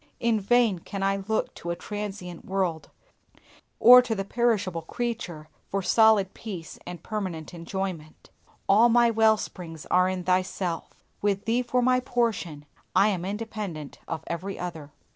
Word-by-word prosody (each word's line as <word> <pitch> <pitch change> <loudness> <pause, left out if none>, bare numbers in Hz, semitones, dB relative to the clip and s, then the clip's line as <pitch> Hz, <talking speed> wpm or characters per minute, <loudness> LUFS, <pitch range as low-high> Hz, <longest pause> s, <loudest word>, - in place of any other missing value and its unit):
In 230 -2 +2
vain 220 -2 +3
can 195 +3 -5
I 195 0 +2
look 220 0 0
to 170 - -7
a 170 - -1
transient 195 -4 -6
world, 185 -4 -2 0.9
or 250 +1 +10
to 245 -3 -2
the 195 -1 -3
perishable 205 -7 0
creature, 180 -5 -4 0.2
for 195 0 -1
solid 215 -2 +4
peace 185 -8 -8
and 175 -2 -8
permanent 185 -7 -4
enjoyment. 170 -2 -6 0.4
All 220 +5 +6
my 235 0 +5
well 220 -1 +4
springs 165 -6 -8
are 180 +1 +4
in 185 -1 -3
Thyself; 185 -1 -1 0.3
with 200 -1 0
Thee 235 +2 +2
for 250 0 0
my 255 0 +4
portion 225 -12 -2 0.3
I 205 - +5
am 185 -4 -2
independent 200 -7 -5
of 160 -1 -4
every 185 +4 -4
other. 160 -5 -6
195 Hz, 150 wpm, -26 LUFS, 175-225 Hz, 0.9 s, or